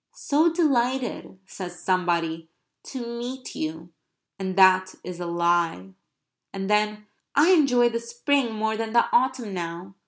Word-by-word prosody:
"So 315 +4 +2
delighted," 260 - 0
says 180 -2 -8
somebody, 170 -3 -1 0.4
"to 255 -3 -6
meet 245 +2 -6
you," 160 +2 -6 0.5
and 190 -1 -3
that 185 -1 +5
is 180 -1 -7
a 175 - -4
lie. 170 - 0 0.6
And 195 -1 -4
then: 210 0 0 0.3
"I 305 +6 +5
enjoy 255 -8 +4
the 230 0 -2
spring 240 +2 0
more 220 0 -1
than 225 0 -4
the 235 - +5
autumn 255 -4 +1
now. 175 +1 -6
210 Hz, 135 wpm, -25 LUFS, 175-245 Hz, 0.6 s, that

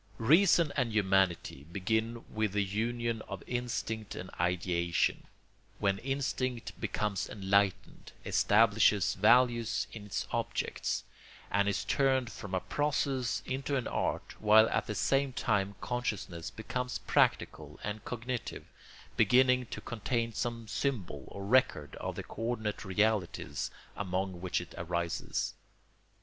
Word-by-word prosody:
Reason 165 - +5
and 125 -4 +1
humanity 95 -8 +1
begin 110 +5 -1
with 110 -2 0
the 105 -1 +2
union 115 +3 -1
of - - -6
instinct 115 -3 -3
and 90 - -7
ideation, 85 -1 +1 0.5
when 100 -1 +1
instinct 130 -2 -2
becomes 105 -2 -1
enlightened, 100 -1 0
establishes 105 -3 +4
values 120 +2 +4
in 105 -2 -9
its 100 - -2
objects, - - -2 0.5
and 100 0 +3
is 100 - -1
turned 130 -3 +2
from 95 -2 -5
a - - +2
process 135 -5 -1
into 135 +2 -2
an 130 -4 -1
art, - - -2
while 110 +1 +7
at - - 0
the 105 - -3
same 135 +2 +1
time 100 -4 0
consciousness 105 -9 -3
becomes 125 +2 -3
practical - - +1
and 105 +1 -4
cognitive, 120 +1 -4 0.5
beginning 125 0 +4
to - - -6
contain 115 +1 -2
some 115 +1 -3
symbol 105 - -2
or 100 0 -7
record 120 - +2
of - - -4
the - - -5
co - - -9
ordinate 110 -3 -2
realities 105 -1 0 0.3
among 95 -2 -2
which 90 -1 0
it 90 - -9
arises. 85 0 -2
110 Hz, 125 wpm, -31 LUFS, 95-125 Hz, 0.5 s, while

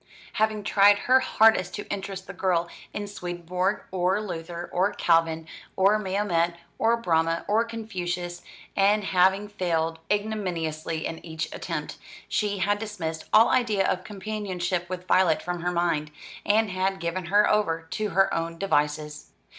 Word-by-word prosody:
Having 215 -1 0
tried 205 0 +5
her 255 +5 +4
hardest 220 -7 +3
to 205 - -6
interest 195 -1 -5
the 195 - -8
girl 175 -2 +1 0.2
in 205 - -4
Swedenborg, 180 0 -3
or 185 +2 +1
Luther, 170 -4 -5
or 185 +3 +2
Calvin, 165 -1 +2 0.3
or 200 +3 +4
Mahomet, 185 -4 0 0.2
or 230 +1 +3
Brahma, 165 -5 +1
or 215 +3 +3
Confucius, 180 -6 -4 0.3
and 205 +2 +3
having 190 +2 +3
failed 165 -5 -1
ignominiously 175 -7 -2
in 165 - -5
each 160 -1 -5
attempt, 155 -3 -5 0.3
she 205 -1 0
had 205 +2 +1
dismissed 165 -7 -5
all 225 +2 +6
idea 220 -6 +2
of 185 - -1
companionship 190 -4 -3
with 180 -1 -5
Violet 185 -4 +3
from 175 -1 -3
her 180 +1 0
mind, 170 -3 0 0.4
and 215 0 +3
had 190 +1 -1
given 170 +2 -3
her 205 +4 +4
over 165 -6 +1
to 215 -1 -2
her 195 0 +3
own 165 0 -2
devices. 150 -4 -1
185 Hz, 145 wpm, -26 LUFS, 170-205 Hz, 0.4 s, all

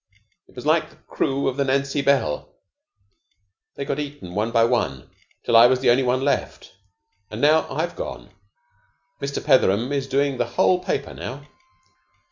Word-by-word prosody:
It - - -23
was - - -9
like - - +2
the - - -21
crew 135 +1 -2
of 135 0 -2
the 140 - +2
'Nancy 140 +1 0
Bell.' 140 - 0 1.3
They 140 - -5
got - - -3
eaten 145 -12 -7
one 105 +4 -1
by 115 0 +3
one, 65 - -2 0.3
till 115 - +1
I 115 +1 +9
was 130 0 +2
the 130 - +3
only 125 +3 +3
one 130 0 0
left. 140 +1 -2 0.6
And 110 - -7
now 155 +4 +3
I've - - -3
gone. - - -7 0.9
Mr. 140 0 -4
Petheram 125 -3 +3
is 140 -1 -2
doing 140 -1 0
the 120 - 0
whole 180 0 +3
paper - - -3
now." 145 +3 -8
135 Hz, 165 wpm, -22 LUFS, 120-140 Hz, 1.3 s, I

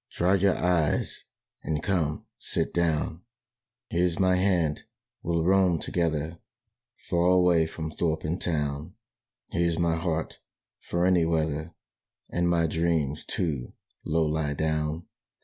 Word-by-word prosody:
Dry 90 +2 +2
your 95 0 +3
eyes 85 -4 0 0.4
and, 75 0 -2
come, 80 -6 0
sit - - -2
down. 80 -1 0 0.7
"Here's 85 0 +1
my 95 -1 +3
hand: 90 -5 +1 0.4
we'll 85 -1 0
roam 95 -2 +4
together, 80 -1 -2 0.7
Far 85 0 +2
away 90 -3 +4
from 80 -1 -5
thorp 80 -1 -1
and 85 +4 -2
town. 75 +1 -2 0.6
Here's 85 -1 +1
my 85 -1 +1
heart, 80 -1 -2 0.4
for 85 +1 -1
any 90 -2 +4
weather, 80 0 -1 0.6
And 85 0 +1
my 85 -1 +3
dreams, 80 -3 0
too, 70 -8 -2 0.3
Low 80 +1 +1
lie 75 -1 -1
down. 75 +1 -1
85 Hz, 125 wpm, -27 LUFS, 80-85 Hz, 0.7 s, roam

